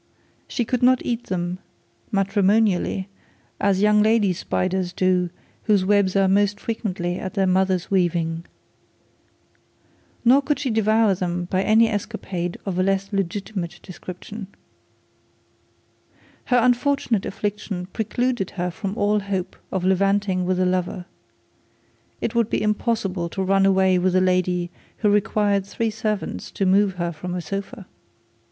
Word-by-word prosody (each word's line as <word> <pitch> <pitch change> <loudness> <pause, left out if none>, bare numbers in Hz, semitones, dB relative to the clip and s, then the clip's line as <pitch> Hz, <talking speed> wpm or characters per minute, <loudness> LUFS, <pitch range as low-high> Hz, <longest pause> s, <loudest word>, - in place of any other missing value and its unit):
She 240 - -2
could 250 +2 -1
not 255 0 +4
eat 240 0 -2
them 180 0 -3 0.5
matrimonially 195 -1 +2 0.5
as 200 -1 +2
young 210 0 +5
lady 215 -3 +3
flies 185 +1 -2
do 180 -1 +1 0.4
whose 205 -3 +3
webs 200 -1 +3
are 195 -1 +4
most 205 +1 +2
frequently 185 -6 -3
of 190 - -5
their 195 -2 +1
mother's 185 -1 +1
weaving. 170 -3 +1 1.8
Nor 260 +4 +6
could 285 +1 0
she 270 -4 -2
devour 220 -1 +3
them 180 -1 -2
by 185 - +2
any 220 +3 +4
escapade 185 -4 -3
of 185 -2 -2
a - - +4
less 195 +1 0
legitimate 195 -1 -3
description. 185 +3 -8 2.0
Her 250 - +3
unfortunate 245 -3 +2
affliction 200 -3 -4
precluded 235 -1 -1
her 180 0 -1
from 195 +3 -5
all 210 +1 +2
hope 195 -2 -3 0.2
of 190 -2 -1
levanting 190 0 +2
with 185 0 +1
a 185 - +3
lover. 180 0 -1 1.2
It - - -1
would 235 -2 +1
be - - 0
impossible 210 -5 -1
to 190 - -3
run 195 +1 +3
away 190 -1 +3
with 185 0 +1
a - - +5
lady 180 -1 +1 0.3
who 210 - +2
required 205 -1 +2
three 225 +3 -2
servants 210 - -3
to 195 - 0
move 195 +1 +3
her 175 -1 -2
from 175 +3 -6
a 180 - -2
sofa. 195 +4 -6
195 Hz, 140 wpm, -23 LUFS, 185-210 Hz, 2.0 s, Nor